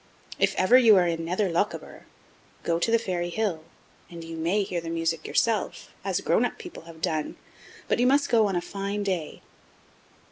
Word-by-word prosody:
If -, -, +2 dB
ever 230 Hz, +8 st, +6 dB
you 225 Hz, -4 st, +7 dB
are 180 Hz, -2 st, +4 dB
in 165 Hz, -1 st, -1 dB
Nether 185 Hz, +3 st, 0 dB
Lochaber, 175 Hz, +5 st, -3 dB, 0.6 s
go 170 Hz, 0 st, 0 dB
to 200 Hz, -, 0 dB
the 230 Hz, -, +5 dB
Fairy 180 Hz, -6 st, -2 dB
Hill, 180 Hz, -5 st, -2 dB, 0.5 s
and 170 Hz, -1 st, -9 dB
you 165 Hz, 0 st, -7 dB
may 170 Hz, +6 st, +1 dB
hear 180 Hz, -3 st, -3 dB
the 165 Hz, -, -6 dB
music 165 Hz, -1 st, -2 dB
yourself, 230 Hz, -2 st, -1 dB
as -, -, -1 dB
grown -, -, +2 dB
up -, -, -2 dB
people 355 Hz, -, -10 dB
have 165 Hz, -1 st, -13 dB
done, 160 Hz, -4 st, -1 dB, 0.5 s
but -, -, +1 dB
you 245 Hz, -, +4 dB
must 280 Hz, +2 st, +3 dB
goon 215 Hz, -5 st, +3 dB
a 175 Hz, -, +1 dB
fine 200 Hz, +2 st, -4 dB
day. 185 Hz, -6 st, -3 dB
180 Hz, 185 wpm, -26 LUFS, 165-210 Hz, 0.6 s, you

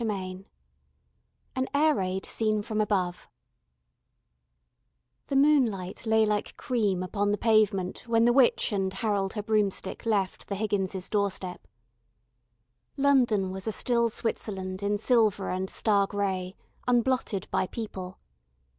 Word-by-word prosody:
CHAPTER 225 Hz, -, -1 dB
VI 185 Hz, 0 st, -7 dB, 1.1 s
AN 260 Hz, 0 st, 0 dB
AIR 305 Hz, +2 st, +4 dB
RAID 190 Hz, -4 st, -2 dB
SEEN 215 Hz, -2 st, 0 dB
FROM 215 Hz, 0 st, -1 dB
ABOVE 185 Hz, -4 st, -1 dB, 2.0 s
The 275 Hz, -, -2 dB
moonlight 240 Hz, -10 st, +2 dB
lay 220 Hz, 0 st, +4 dB
like 210 Hz, -1 st, -2 dB
cream 205 Hz, -7 st, 0 dB
upon 205 Hz, +2 st, -1 dB
the 205 Hz, -, +1 dB
pavement 210 Hz, -3 st, +1 dB
when 230 Hz, 0 st, +3 dB
the 240 Hz, -, +4 dB
witch 255 Hz, -3 st, +3 dB
and 195 Hz, -2 st, 0 dB
Harold 195 Hz, -1 st, -1 dB
her 210 Hz, -, -4 dB
broomstick 210 Hz, 0 st, -1 dB
left 200 Hz, -4 st, -1 dB
the 200 Hz, -, -3 dB
Higgins' 195 Hz, -3 st, -2 dB
doorstep. 195 Hz, -3 st, -2 dB, 1.3 s
London 245 Hz, -9 st, +3 dB
was 190 Hz, +2 st, -6 dB
a -, -, +1 dB
still 235 Hz, +1 st, +1 dB
Switzerland 190 Hz, -4 st, -3 dB
in 205 Hz, +1 st, 0 dB
silver 215 Hz, -4 st, +2 dB
and 185 Hz, +1 st, -2 dB
star 200 Hz, -3 st, +2 dB
grey, 190 Hz, -2 st, -2 dB, 0.3 s
unblotted 245 Hz, -5 st, +1 dB
by -, -, +1 dB
people. 190 Hz, -4 st, -6 dB
205 Hz, 130 wpm, -27 LUFS, 190-225 Hz, 2.0 s, AIR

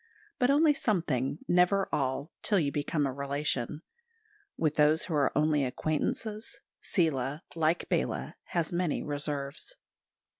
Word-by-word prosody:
But 250 Hz, -1 st, +3 dB
only 295 Hz, +2 st, +5 dB
something, 170 Hz, -, -1 dB
never 180 Hz, +2 st, +3 dB
all, 140 Hz, +2 st, -1 dB
till 205 Hz, -, +3 dB
you 145 Hz, -4 st, 0 dB
become 145 Hz, +1 st, 0 dB
a 135 Hz, -, -1 dB
relation; 140 Hz, +1 st, -2 dB, 0.7 s
with 155 Hz, -2 st, +1 dB
those 155 Hz, +1 st, +4 dB
who 170 Hz, -, -4 dB
are 145 Hz, -2 st, +3 dB
only 150 Hz, -1 st, +3 dB
acquaintances 155 Hz, -, -2 dB, 0.2 s
Seela, 145 Hz, -4 st, 0 dB
like 165 Hz, +1 st, +1 dB
Bala, -, -, -1 dB
has 170 Hz, -1 st, -2 dB
many 175 Hz, -3 st, 0 dB
reserves. 145 Hz, -, -4 dB
155 Hz, 125 wpm, -30 LUFS, 140-180 Hz, 0.7 s, only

